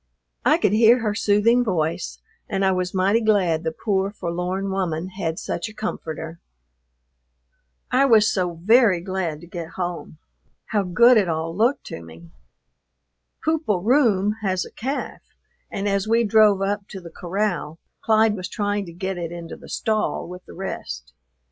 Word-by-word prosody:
I -, -, +4 dB
could -, -, +2 dB
hear 230 Hz, +3 st, +5 dB
her 215 Hz, -2 st, 0 dB
soothing 220 Hz, +4 st, +3 dB
voice, 155 Hz, -, -2 dB, 0.3 s
and 195 Hz, 0 st, 0 dB
I 190 Hz, -, +4 dB
was 180 Hz, -1 st, -1 dB
mighty 195 Hz, +4 st, +2 dB
glad 190 Hz, -7 st, +2 dB
the 160 Hz, -, -1 dB
poor, 195 Hz, +2 st, -1 dB
forlorn 185 Hz, 0 st, -3 dB
woman 180 Hz, -2 st, -2 dB
had 170 Hz, -4 st, -3 dB
such 220 Hz, -, -4 dB
a 215 Hz, -, -14 dB
comforter. 160 Hz, -6 st, -5 dB, 1.5 s
I 265 Hz, +2 st, +4 dB
was 220 Hz, -4 st, +5 dB
so 180 Hz, -3 st, -1 dB
very 205 Hz, +2 st, +4 dB
glad 175 Hz, -4 st, -3 dB
to -, -, -11 dB
get 170 Hz, -2 st, -7 dB
home. 175 Hz, -3 st, -4 dB, 0.5 s
How 210 Hz, -2 st, +2 dB
good 235 Hz, +7 st, +5 dB
it 195 Hz, -5 st, +2 dB
all 165 Hz, +1 st, -2 dB
looked 235 Hz, +7 st, +2 dB
to 85 Hz, -, -8 dB
me! 80 Hz, 0 st, -13 dB, 1.1 s
"Poop 320 Hz, 0 st, +1 dB
o' 205 Hz, -4 st, +2 dB
Roome" 215 Hz, -2 st, +2 dB
has 185 Hz, -3 st, 0 dB
a -, -, -12 dB
calf, 270 Hz, +5 st, -4 dB, 0.5 s
and 200 Hz, +1 st, -3 dB
as 200 Hz, 0 st, 0 dB
we 230 Hz, +1 st, +3 dB
drove 210 Hz, -2 st, +4 dB
up 200 Hz, +1 st, -2 dB
to 195 Hz, -, -8 dB
the 170 Hz, -2 st, -11 dB
corral 180 Hz, -4 st, -2 dB, 0.3 s
Clyde 220 Hz, -1 st, +3 dB
was 185 Hz, -2 st, -5 dB
trying 205 Hz, -2 st, -2 dB
to 170 Hz, -, -9 dB
get 190 Hz, +1 st, -4 dB
it 170 Hz, -1 st, -4 dB
into 170 Hz, -1 st, -7 dB
the -, -, -14 dB
stall 215 Hz, -1 st, -1 dB
with 180 Hz, +1 st, -9 dB
the -, -, -12 dB
rest. 65 Hz, -, -6 dB
195 Hz, 165 wpm, -23 LUFS, 175-215 Hz, 1.5 s, hear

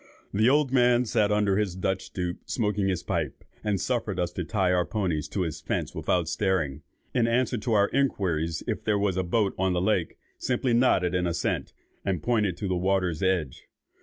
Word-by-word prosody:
The 110 Hz, +4 st, +4 dB
old 145 Hz, -1 st, +3 dB
man 125 Hz, -1 st, +4 dB
sat 105 Hz, -2 st, +2 dB
under 105 Hz, -2 st, +2 dB
his 105 Hz, -4 st, 0 dB
Dutch 95 Hz, 0 st, -1 dB
stoup, 90 Hz, -1 st, -4 dB
smoking 105 Hz, -4 st, 0 dB
his 90 Hz, -2 st, -1 dB
pipe, -, -, -3 dB, 0.2 s
and 105 Hz, -2 st, 0 dB
suffered 105 Hz, -2 st, -1 dB
us 90 Hz, -1 st, 0 dB
to -, -, -3 dB
tie 95 Hz, -5 st, +1 dB
our 90 Hz, -1 st, +3 dB
ponies 85 Hz, -7 st, -2 dB
to 95 Hz, -, -3 dB
his 80 Hz, -4 st, -3 dB
fence -, -, -2 dB
without 90 Hz, -3 st, 0 dB
stirring; 85 Hz, -6 st, 0 dB, 0.3 s
and 120 Hz, -2 st, +2 dB
in 115 Hz, -, 0 dB
answer 125 Hz, -1 st, +1 dB
to 115 Hz, +1 st, -1 dB
our 100 Hz, -1 st, +4 dB
inquiries 85 Hz, -, 0 dB
if -, -, -3 dB
there 105 Hz, -2 st, +2 dB
was 100 Hz, -2 st, +1 dB
a 95 Hz, -, +1 dB
boat 100 Hz, +2 st, +1 dB
on 95 Hz, -1 st, +2 dB
the 90 Hz, -, +1 dB
lake, 90 Hz, -3 st, 0 dB, 0.2 s
simply 125 Hz, -1 st, 0 dB
nodded 95 Hz, -7 st, +3 dB
an 90 Hz, -1 st, +1 dB
assent, 85 Hz, -1 st, -2 dB, 0.3 s
and 95 Hz, -4 st, -1 dB
pointed 105 Hz, -7 st, +1 dB
to 100 Hz, -, -3 dB
the 95 Hz, -, 0 dB
water's 90 Hz, -2 st, 0 dB
edge. 90 Hz, -8 st, -1 dB
95 Hz, 200 wpm, -27 LUFS, 90-110 Hz, 0.3 s, The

